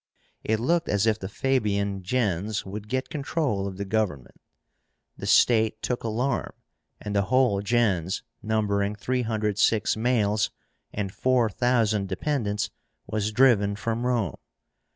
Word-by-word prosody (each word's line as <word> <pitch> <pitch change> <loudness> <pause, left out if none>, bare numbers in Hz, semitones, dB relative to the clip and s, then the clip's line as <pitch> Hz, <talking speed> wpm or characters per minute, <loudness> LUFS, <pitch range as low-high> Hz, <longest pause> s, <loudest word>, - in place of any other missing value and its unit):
It 110 0 0
looked 170 +8 +1
as 100 +1 +2
if 110 -1 +2
the 95 - -5
Fabian 100 -6 0
gens 100 -1 -1
would 100 +2 -7
get 130 +3 -2
control 140 - -1
of 95 -1 -7
the 100 - -3
government. 95 - -2 0.7
The - - -6
state 110 -2 +4
took 125 - -2
alarm, 115 +5 -1 0.5
and 105 -1 -5
the 100 -1 +2
whole 125 -6 +3
gens, 100 -5 +1 0.2
numbering 105 -2 0
306 110 -2 +1
males 110 -3 +1 0.4
and 100 -2 -4
4,000 115 -4 +1
dependents, 105 -1 -1 0.3
was 105 +1 -2
driven 110 -4 +4
from 115 +2 -2
Rome. 115 - 0
110 Hz, 125 wpm, -26 LUFS, 100-120 Hz, 0.7 s, state